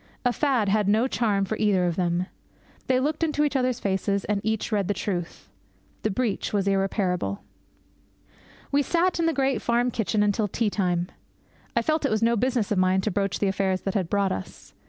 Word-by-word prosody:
A 245 - +3
fad 260 -8 +1
had 205 0 +2
no 220 +5 +3
charm 210 -6 +1
for 220 - -2
either 200 -4 +2
of 175 -2 0
them. 175 0 0 0.6
They 255 -1 +3
looked 300 +4 -1
into 300 -2 +1
each 290 -1 0
other's 255 -2 +1
faces, 200 0 -1
and 205 -1 -1
each 220 +1 -1
read 200 -3 +1
the 205 - 0
truth. 175 -4 -4 0.5
The 215 - 0
breach 220 0 -1
was 200 -2 0
irreparable. 195 - 0 1.3
We 285 - +3
sat 345 +4 +1
in 330 - +2
the - - +3
great 270 -5 0
farm 240 +1 +1
kitchen 215 -2 0
until 205 +1 +1
tea 210 +2 -1
time. 180 -3 0 0.7
I - - +2
felt 310 -1 0
it 280 - +2
was 215 +1 0
no 235 +1 +3
business 240 -2 0
of 200 - +2
mine 185 +1 +3
to 215 - -1
broach 195 0 -1
the 200 - 0
affairs 190 -1 0
that 195 - -3
had 185 -5 -1
brought 200 -2 +1
us. 95 - -7
210 Hz, 200 wpm, -25 LUFS, 195-250 Hz, 1.3 s, A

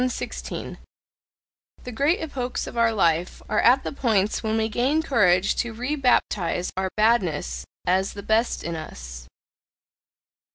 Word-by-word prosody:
The 255 -1 -4 1.1
great 285 +9 +2
epochs 260 -6 -3
of - - -8
our 230 -1 +3
life 170 -5 0
are 215 - +1
at 255 +3 +5
the - - -3
points 220 -7 +1
when 220 0 -1
we 220 0 +1
gain 260 +8 +1
courage 200 - +3
to 235 -2 -2
rebaptize 245 - 0
our 190 0 -1
badness 170 - +1 0.2
as 190 +2 +1
the 200 - -8
best 220 +3 +1
in 170 0 -3
us. - - -8
220 Hz, 130 wpm, -24 LUFS, 180-245 Hz, 1.1 s, at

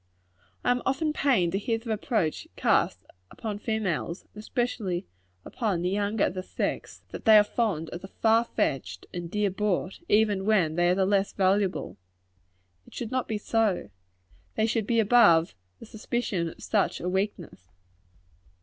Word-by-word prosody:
I 245 - +3
am 245 0 +1
often 300 +3 0
pained 240 - +2
to 195 - 0
hear 225 +2 -1
the 225 0 -6
reproach 215 - -1
cast - - +1 0.2
upon 210 -2 -5
females, 200 -6 -2
and 210 - -9
especially 215 -6 -2 0.4
upon 200 -8 -2
the 180 - 0
younger 205 +1 +1
of - - -2
the 185 - -4
sex, - - -4
that - - -9
they 220 -2 +8
are 210 - +7
fond 205 -8 -2
of 170 - -6
the 190 - -8
"far 225 +3 +2
fetched" 105 - -2
and 175 -1 -5
"dear 205 +1 0
bought," 190 -1 -1
even 205 -2 +3
when 185 -8 +3
they 175 +1 +2
are 180 - +3
the 190 0 +2
less 195 0 +1
valuable. 195 0 0 0.9
It - - -15
should 235 -2 -5
not 255 -1 -1
be 220 - -2
so. 215 -2 0 0.6
They 220 - +2
should 220 -1 -1
be 230 -1 +2
above 205 -7 +5 0.2
the - - -12
suspicion 215 -5 -2
of - - -13
such - - 0
a 180 - -4
weakness. 180 - -3
205 Hz, 165 wpm, -27 LUFS, 180-225 Hz, 0.9 s, they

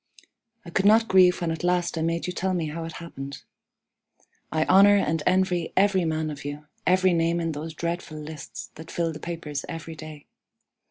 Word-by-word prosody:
I 170 - -9
could 195 +3 +2
not 225 +2 +5
grieve 180 -1 +5
when 170 -1 0
at 160 - -4
last 180 -1 +1
I 160 - -2
made 165 +1 -1
you 180 - -3
tell 185 +1 -1
me 165 -3 -1
how 165 +2 -5
it 165 - -7
happened. 140 -5 -8 1.1
I 155 0 +1
honor 200 +2 +7
and 160 -4 0
envy 180 -2 +1
every 190 -2 +4
man 155 -1 -1
of 145 -1 -8
you 145 +1 -6 0.2
every 185 0 +4
name 170 0 +1
in 165 -1 -1
those 155 +1 -6
dreadful 170 -2 -4
lists 150 -1 -8
that 160 +1 -11
fill 165 -1 -1
the 150 - -8
papers 160 -4 -5
every 165 -1 -6
day. 155 -2 -10
165 Hz, 195 wpm, -25 LUFS, 155-180 Hz, 1.1 s, honor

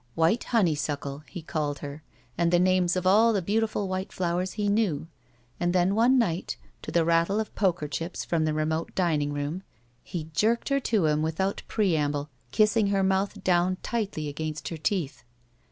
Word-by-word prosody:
"White 165 +8 +2
honeysuckle," 150 - 0
he 175 -4 -7
called 150 -3 -2
her, 145 +2 -7 0.3
and 170 -1 +1
the 175 - +5
names 180 0 +3
of 185 0 -2
all 220 +5 +5
the 200 - +2
beautiftil 215 +1 0
white 185 0 -3
flowers 180 +1 -1
he 210 -1 -1
knew. 200 -8 +1 0.5
And 175 0 +1
then 185 +1 +3
one 240 +5 +4
night, 185 -7 0 0.2
to - - -7
the 170 -1 +2
rattle 170 +5 +2
of 220 - -4
poker 175 -6 0
chips 165 +5 -4
from 165 -2 +1
the 155 - 0
remote 160 +1 -1
dining 155 -6 +1
room, 145 +5 -3 0.4
he 160 -2 -6
jerked 225 - +1
her 275 0 +2
to 220 -9 +1
him 150 0 +2
with 160 +2 -2
out 190 +1 0
preamble, 150 -8 0 0.2
kissing 215 - +3
her 195 -1 +1
mouth 190 +1 0
down 180 0 +2
tightly 200 -10 -2
against 155 +1 -4
her 165 - -5
teeth. 155 -2 -2
175 Hz, 180 wpm, -27 LUFS, 155-200 Hz, 0.5 s, the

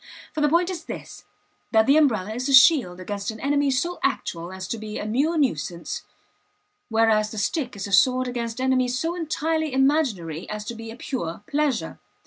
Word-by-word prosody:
For 310 - -2
the 295 - +4
point 345 +4 +2
is 335 -3 -6
this: - - -8 0.5
that 220 -1 +5
the 275 - +5
umbrella 220 -10 +2
is 255 +4 -3
a 275 - +7
shield 250 - +6
against 200 +2 -4
an 220 -1 -6
enemy 285 +2 +1
so 340 +7 -1
actual 170 -10 -2
as 190 -1 -6
to 230 - -3
be 215 0 -6
a - - -4
mere 280 +10 +1
nuisance; 175 - -1 0.9
whereas 220 -1 +3
the 215 - -8
stick 250 +4 -1
is 195 - -5
a 200 - -7
sword 255 +6 +4
against 235 -1 -4
enemies 255 -1 +1
so 325 +5 -1
entirely 320 -2 -1
imaginary 260 - 0
as 210 0 -5
to 235 - -5
be 225 0 -8
a 225 - -8
pure 220 - -5
pleasure. 290 -4 -1
250 Hz, 190 wpm, -24 LUFS, 210-290 Hz, 0.9 s, a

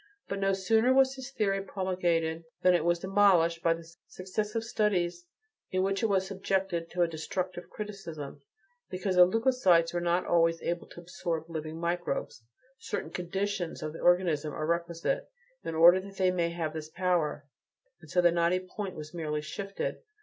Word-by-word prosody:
But 200 - -3
no 195 0 +2
sooner 220 +6 +3
was 265 0 +5
his 265 -1 -8
theory 200 -6 0
promulgated 175 -4 -1 0.2
than 180 - +6
it 175 -3 +2
was 170 +1 +2
demolished 185 -3 +3
by 165 -1 +3
the 165 0 -11 0.2
successive 210 +4 -3
studies 180 -6 0 0.4
in 185 0 0
which 195 +1 0
it 225 - +3
was 190 -2 +2
subjected 190 -3 -1
to 175 0 +1
a - - +2
destructive 175 +2 -4
criticism, 195 -9 -7 0.5
because 185 +1 -2
the 180 0 +9
leucocytes 190 -7 +3
are 175 - -1
not 175 +1 +1
always 165 -1 +3
able 170 0 -2
to 175 - -11
absorb 170 -2 -4
living 160 0 -5
microbes; 170 -7 -2 0.4
certain - - -4
"conditions" 190 -1 -3
of 155 0 -4
the - - -8
organism 170 -4 +2
are 155 - -2
requisite 170 - -1 0.3
in 165 - -4
order 170 +3 +8
that 195 +1 -10
they 185 -1 +3
may 170 -2 0
have 165 -2 -3
this 155 -1 -6
power, 165 -4 0 0.6
and - - -15
so 180 - +3
the 175 -1 +5
knotty 170 +2 +2
point 185 +1 -6
was 150 +1 -8
merely 155 -3 -2
shifted. 195 +5 -4
175 Hz, 170 wpm, -29 LUFS, 165-195 Hz, 0.6 s, the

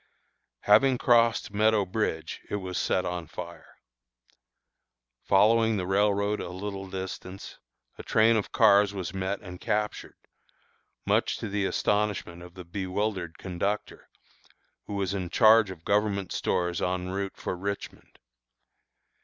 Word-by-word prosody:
Having 125 +5 +5
crossed 115 -3 +3
Meadow 110 0 +3
Bridge, 90 -5 -3
it - - -2
was 95 -3 -3
set 90 - 0
on 90 -2 -4
fire. 85 +1 -10 1.5
Following 110 +2 +4
the 90 - -2
railroad 100 +2 +1
a - - -5
little 95 +1 -6
distance, 95 0 -7 0.4
a - - -4
train 110 +1 +3
of 110 - -1
cars 100 0 +4
was 95 -2 -4
met 95 +1 -2
and 90 -3 -10
captured, 105 0 -2 0.9
much - - +1
to 115 - -5
the 100 0 -1
astonishment 105 -5 -1
of 90 0 -13
the 90 -1 -9
bewildered 95 -1 -3
conductor, 100 +3 -4 0.8
who 100 - -5
was 100 -1 -1
in 95 -3 -3
charge 110 0 +5
of 85 -3 -10
government 100 -2 0
stores 90 -1 -1
en 90 0 -1
route 100 0 -4
for - - -4
Richmond. 100 +3 -6
100 Hz, 130 wpm, -27 LUFS, 90-105 Hz, 1.5 s, Having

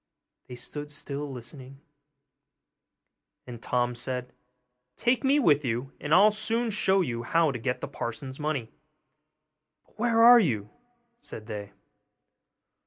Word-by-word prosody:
They 125 - -8
stood 145 +4 -8
still 145 0 -5
listening, 130 +2 -10 1.7
and 120 -2 -9
Tom 125 0 0
said, 125 +1 -5 0.6
'Take 240 +3 +1
me 275 +2 +4
with 150 - +3
you, 125 +2 -2
and 150 - -6
I'll 210 +6 +7
soon 225 +2 -1
show 195 -2 +2
you 120 -8 -2
how 165 +5 +2
to 125 - -5
get 125 +3 -2
the - - -4
parson's 130 +4 -6
money.' 150 -7 -2 1.1
'But - - -31
where 230 0 +3
are 240 +1 +9
you?' 110 - -1 0.5
said 110 - -9
they. 105 -2 -7
140 Hz, 130 wpm, -27 LUFS, 120-195 Hz, 1.7 s, are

